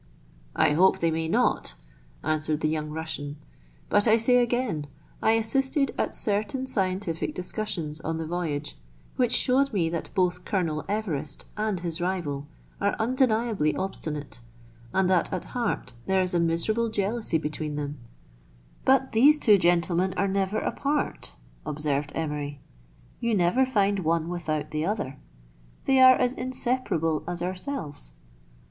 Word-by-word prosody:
" -, -, -29 dB
I -, -, +4 dB
hope 185 Hz, +6 st, +4 dB
they 165 Hz, -1 st, +1 dB
may 160 Hz, 0 st, -1 dB
not," -, -, +1 dB, 0.5 s
answered 155 Hz, 0 st, 0 dB
the -, -, +2 dB
young 155 Hz, -1 st, -2 dB
Russian; 150 Hz, -2 st, -4 dB, 0.5 s
"but 205 Hz, +2 st, +3 dB
I 220 Hz, +1 st, +6 dB
say 245 Hz, +2 st, +4 dB
again, 240 Hz, -, 0 dB, 0.3 s
I 220 Hz, -, +4 dB
assisted 270 Hz, +5 st, +2 dB
at -, -, -1 dB
certain 215 Hz, +6 st, +2 dB
scientific 185 Hz, -7 st, 0 dB
discussions 180 Hz, -5 st, -3 dB
on 160 Hz, 0 st, -2 dB
the 160 Hz, -, -3 dB
voyage, 155 Hz, -4 st, -3 dB, 0.4 s
which 245 Hz, -2 st, +1 dB
showed 275 Hz, +2 st, +4 dB
me 175 Hz, -7 st, +1 dB
that 170 Hz, 0 st, -4 dB
both 180 Hz, -2 st, +1 dB
Colonel 165 Hz, -7 st, -1 dB
Everest 160 Hz, -9 st, -3 dB
and 210 Hz, -4 st, -1 dB
his 170 Hz, -1 st, -3 dB
rival 160 Hz, -6 st, -2 dB, 0.3 s
are 200 Hz, 0 st, +1 dB
undeniably 225 Hz, -, +1 dB
obstinate, 150 Hz, -9 st, -4 dB, 0.5 s
and 190 Hz, -1 st, +2 dB
that 180 Hz, -2 st, +2 dB
at 185 Hz, -, -3 dB
heart 235 Hz, -, -2 dB
there 190 Hz, -1 st, +3 dB
is 180 Hz, -, -2 dB
a 175 Hz, -, +2 dB
miserable 170 Hz, +8 st, +1 dB
jealousy 215 Hz, -3 st, 0 dB
between 150 Hz, -1 st, -4 dB
them," 145 Hz, -1 st, -4 dB, 0.4 s
" -, -, -29 dB
But 265 Hz, 0 st, +3 dB
these 280 Hz, +7 st, +6 dB
two 210 Hz, -8 st, +5 dB
gentlemen 175 Hz, +1 st, +2 dB
are 200 Hz, -, +2 dB
never 195 Hz, +1 st, 0 dB
apart," 290 Hz, +5 st, -2 dB, 0.3 s
observed 150 Hz, 0 st, -1 dB
Emery. 150 Hz, -2 st, -3 dB, 0.6 s
"You 235 Hz, -2 st, +1 dB
never 195 Hz, +9 st, +3 dB
find 200 Hz, -5 st, +2 dB
one 165 Hz, -1 st, 0 dB
without 160 Hz, -4 st, -3 dB
the 155 Hz, 0 st, -1 dB
other; 170 Hz, -8 st, -3 dB, 0.7 s
they 265 Hz, -1 st, +4 dB
are 255 Hz, 0 st, +9 dB
as 250 Hz, 0 st, +1 dB
inseparable 250 Hz, -11 st, -1 dB
as 175 Hz, 0 st, -3 dB
ourselves." 180 Hz, -, -5 dB
180 Hz, 145 wpm, -26 LUFS, 155-220 Hz, 0.7 s, are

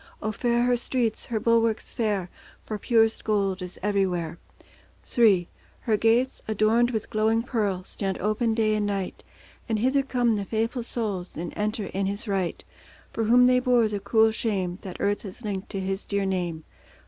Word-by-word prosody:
O 215 Hz, -, -2 dB
fair 240 Hz, +2 st, +1 dB
her 245 Hz, 0 st, +3 dB
streets, 240 Hz, -2 st, -1 dB
her 225 Hz, -2 st, -1 dB
bulwarks 230 Hz, 0 st, +1 dB
fair, 205 Hz, -7 st, -1 dB, 0.3 s
For 215 Hz, -1 st, -6 dB
purest 225 Hz, 0 st, +2 dB
gold 200 Hz, -3 st, 0 dB
is 180 Hz, 0 st, -7 dB
everywhere. 180 Hz, -5 st, 0 dB, 0.8 s
III 200 Hz, -7 st, +5 dB, 0.3 s
Her 220 Hz, -, +1 dB
gates, 230 Hz, +5 st, +2 dB
adorned 220 Hz, +3 st, +3 dB
with 220 Hz, -3 st, -3 dB
glowing 220 Hz, +1 st, +2 dB
pearl, 205 Hz, -7 st, -1 dB
Stand 195 Hz, 0 st, -3 dB
open 220 Hz, +3 st, 0 dB
day 215 Hz, -1 st, +2 dB
and 210 Hz, -1 st, 0 dB
night, 195 Hz, -2 st, -3 dB, 0.5 s
And 220 Hz, -, +1 dB
hither 260 Hz, +5 st, +2 dB
come 245 Hz, -4 st, +1 dB
the 200 Hz, -, -3 dB
faithful 225 Hz, +4 st, -1 dB
souls, 210 Hz, -8 st, -4 dB
And 170 Hz, +1 st, -5 dB
enter 210 Hz, 0 st, -1 dB
in 195 Hz, 0 st, -2 dB
His 200 Hz, +3 st, -4 dB
right, 190 Hz, -3 st, -1 dB, 0.5 s
For 225 Hz, -, -1 dB
whom 245 Hz, +3 st, +6 dB
they 250 Hz, 0 st, +5 dB
bore 250 Hz, -3 st, +3 dB
the 210 Hz, -1 st, -3 dB
cruel 220 Hz, +2 st, +3 dB
shame, 195 Hz, -5 st, -2 dB
That 185 Hz, -2 st, -7 dB
earth 205 Hz, 0 st, 0 dB
has 200 Hz, +4 st, -10 dB
linked 200 Hz, -3 st, -4 dB
to 195 Hz, -, -4 dB
His 190 Hz, +1 st, -2 dB
dear 200 Hz, -1 st, -1 dB
name. 175 Hz, -4 st, -2 dB
215 Hz, 175 wpm, -26 LUFS, 195-230 Hz, 0.8 s, whom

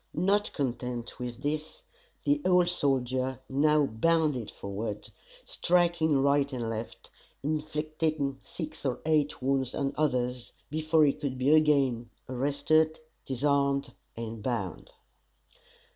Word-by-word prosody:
Not 200 Hz, +5 st, +2 dB
content 125 Hz, -3 st, -3 dB
with 125 Hz, +1 st, -6 dB
this, 155 Hz, +2 st, -3 dB, 0.4 s
the 145 Hz, 0 st, +2 dB
old 180 Hz, -1 st, +4 dB
soldier 130 Hz, -5 st, 0 dB
now 150 Hz, +2 st, +3 dB
bounded 145 Hz, 0 st, +1 dB
forward, 105 Hz, +1 st, -5 dB, 0.3 s
striking 170 Hz, -, +2 dB
right 140 Hz, 0 st, +3 dB
and 120 Hz, -3 st, -3 dB
left, 115 Hz, +1 st, -7 dB, 0.3 s
inflicting 155 Hz, -1 st, -1 dB
six 155 Hz, -3 st, -7 dB
or 130 Hz, -3 st, -1 dB
eight 150 Hz, -4 st, +1 dB
wounds 135 Hz, -1 st, 0 dB
on 140 Hz, 0 st, -1 dB
others, 125 Hz, -4 st, -1 dB, 0.2 s
before 155 Hz, 0 st, +3 dB
he 140 Hz, -, +3 dB
could 135 Hz, -3 st, -4 dB
be 130 Hz, +4 st, +3 dB
again 140 Hz, -7 st, +3 dB, 0.2 s
arrested, 145 Hz, +5 st, +1 dB, 0.3 s
disarmed, 140 Hz, +1 st, +1 dB, 0.2 s
and 115 Hz, -1 st, -5 dB
bound. 100 Hz, -8 st, -3 dB
140 Hz, 115 wpm, -29 LUFS, 125-155 Hz, 0.4 s, old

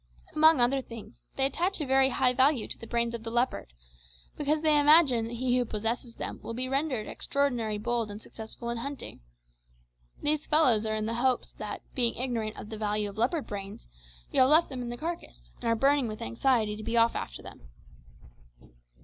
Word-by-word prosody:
Among 315 Hz, -1 st, +6 dB
other 255 Hz, +3 st, +3 dB
things, 230 Hz, -2 st, -11 dB
they 270 Hz, -, +2 dB
attach 350 Hz, +8 st, 0 dB
a 300 Hz, -, -2 dB
very 265 Hz, 0 st, +4 dB
high 255 Hz, -1 st, +2 dB
value 260 Hz, -1 st, +3 dB
to -, -, -4 dB
the 230 Hz, -, -9 dB
brains 235 Hz, 0 st, 0 dB
of 235 Hz, -, -5 dB
the 225 Hz, -, -5 dB
leopard, 240 Hz, -, -1 dB, 0.6 s
because 300 Hz, +1 st, 0 dB
they 305 Hz, -2 st, +4 dB
imagine 290 Hz, -6 st, +5 dB
that 235 Hz, +1 st, -6 dB
he 250 Hz, +1 st, 0 dB
who -, -, +2 dB
possesses 230 Hz, +2 st, -3 dB
them -, -, -5 dB
will 230 Hz, -, -6 dB
be 255 Hz, +2 st, -2 dB
rendered 270 Hz, -4 st, -1 dB
extraordinarily 245 Hz, -7 st, -1 dB
bold 235 Hz, 0 st, -1 dB
and 205 Hz, 0 st, -7 dB
successful 225 Hz, +2 st, -8 dB
in 235 Hz, -, -3 dB
hunting. 280 Hz, +3 st, -6 dB, 1.0 s
These 300 Hz, 0 st, 0 dB
fellows 250 Hz, -9 st, +4 dB
are 215 Hz, -, -1 dB
in 215 Hz, 0 st, -2 dB
hopes 240 Hz, +2 st, 0 dB
that, -, -, -7 dB
being 240 Hz, -3 st, +2 dB
ignorant 235 Hz, -4 st, -2 dB
of 210 Hz, -, -8 dB
the 220 Hz, -, -6 dB
value 210 Hz, -1 st, -1 dB
of 210 Hz, -, -11 dB
leopard 275 Hz, +6 st, 0 dB
brains, 200 Hz, -, -7 dB, 0.4 s
you -, -, +1 dB
have 260 Hz, -, +5 dB
left 315 Hz, +3 st, +5 dB
them 255 Hz, -2 st, -5 dB
in 240 Hz, -, -5 dB
the 240 Hz, -, -5 dB
carcass, 150 Hz, -, -7 dB
and -, -, -8 dB
are 230 Hz, -, +3 dB
burning 275 Hz, +2 st, +2 dB
with 215 Hz, -1 st, -6 dB
anxiety 210 Hz, -, +1 dB
to 215 Hz, -, -8 dB
be 230 Hz, +2 st, -1 dB
off 230 Hz, 0 st, +4 dB
after -, -, -6 dB
them." -, -, -13 dB
240 Hz, 200 wpm, -28 LUFS, 220-275 Hz, 1.0 s, Among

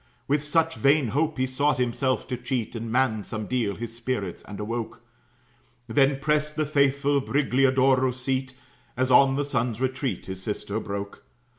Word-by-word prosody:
With 145 Hz, +1 st, +1 dB
such 160 Hz, +2 st, +1 dB
vain 140 Hz, -2 st, +3 dB
hope 150 Hz, +5 st, 0 dB
he 130 Hz, -, +1 dB
sought 140 Hz, +3 st, +1 dB
himself 125 Hz, +1 st, 0 dB
to 125 Hz, -, -1 dB
cheat, 120 Hz, -2 st, -3 dB
And 115 Hz, 0 st, -4 dB
manned 115 Hz, -4 st, +1 dB
some 110 Hz, -2 st, -4 dB
deal 115 Hz, -4 st, -1 dB
his 115 Hz, 0 st, -6 dB
spirits 115 Hz, -6 st, -3 dB
and 105 Hz, -, -8 dB
awoke; 115 Hz, +2 st, -4 dB, 0.8 s
Then 135 Hz, +4 st, +3 dB
prest 150 Hz, +1 st, 0 dB
the 155 Hz, -, 0 dB
faithful 140 Hz, -1 st, +2 dB
Brigliadoro's 130 Hz, 0 st, +2 dB
seat, 130 Hz, 0 st, -2 dB, 0.4 s
As 130 Hz, 0 st, +1 dB
on 135 Hz, +1 st, +6 dB
the 145 Hz, +1 st, 0 dB
sun's 120 Hz, -5 st, -1 dB
retreat 130 Hz, -5 st, -2 dB
his 95 Hz, 0 st, -6 dB
sister 105 Hz, +1 st, -3 dB
broke. 100 Hz, -1 st, -6 dB
130 Hz, 160 wpm, -26 LUFS, 115-140 Hz, 0.8 s, on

